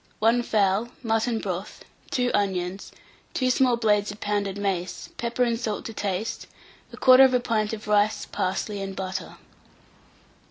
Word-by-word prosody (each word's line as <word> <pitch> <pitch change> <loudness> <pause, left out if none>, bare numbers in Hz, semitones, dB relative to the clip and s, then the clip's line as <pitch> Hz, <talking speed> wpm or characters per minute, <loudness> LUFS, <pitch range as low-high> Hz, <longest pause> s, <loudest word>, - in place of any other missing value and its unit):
1 230 +3 +3
fowl, 210 0 +1
mutton 225 +1 +1
broth, 190 -2 -5 0.2
2 250 -2 0
onions, 190 -1 -1 0.4
2 255 -1 +2
small 250 -2 +3
blades 210 -3 +2
of 205 +1 -8
pounded 205 -1 -1
mace, 190 -3 -3
pepper 235 +1 0
and 235 -2 0
salt 220 -3 -3
to 225 - -6
taste, 205 +1 -3 0.4
1/4 255 -1 +6
pint 215 -3 0
of 220 -1 -6
rice, 210 0 +2
parsley 195 +2 -2
and 195 0 -5
butter. 190 0 -5
210 Hz, 135 wpm, -25 LUFS, 195-235 Hz, 0.4 s, 1/4